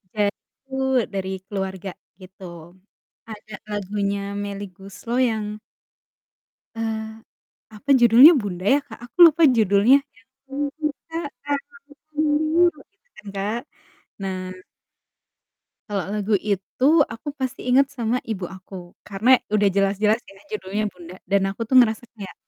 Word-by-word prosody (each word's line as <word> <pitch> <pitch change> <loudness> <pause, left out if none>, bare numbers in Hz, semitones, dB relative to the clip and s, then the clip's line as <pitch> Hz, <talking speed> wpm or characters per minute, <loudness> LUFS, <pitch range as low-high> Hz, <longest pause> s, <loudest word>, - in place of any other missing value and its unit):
yaitu 215 +6 -4 0.4
dari 190 -1 -3 0.2
keluarga 190 -2 -4 0.3
gitu. 190 +1 -14 0.8
Ada 215 -1 -9
lagunya 200 0 -3
Melly 205 0 -5
Goeslaw 195 +6 -6
yang 215 -1 -3 1.3
eee, 220 -1 -3 0.6
apa 245 +7 -13
judulnya? 240 +6 +9
Bunda 195 -7 -3
ya - - +2
Kak? 225 -5 -12
Aku 245 - -48
lupa 325 +1 +2
judulnya 225 +2 +5 0.2
yang, 255 +3 -25 0.2
"Kubuka 290 +3 -4 0.3
album 290 +12 -3 0.4
biru," 310 +2 +2 0.3
gitu 395 +5 -44
kan 215 -2 -14
Kak. 210 +5 -2 0.6
Nah 190 -1 -3 1.5
kalo 200 -2 -1
lagu 210 0 0
itu 200 +5 -2 0.3
aku 235 +6 -12
pasti 260 0 -4
inget 260 +2 +4
sama 250 -3 -2
ibu 200 -4 -4
aku, 190 +1 -12 0.3
karena 225 +6 +4 0.2
udah 205 -1 +4
jelas-jelas 205 +3 +2
ya 195 - -15 0.2
judulnya 210 0 -3
Bunda 175 0 -12 0.2
dan 200 -1 +4
aku 195 +4 -4
tuh 260 +4 -1
ngerasa 225 -1 +3
kayak 205 -5 -9
215 Hz, 125 wpm, -23 LUFS, 200-255 Hz, 1.5 s, judulnya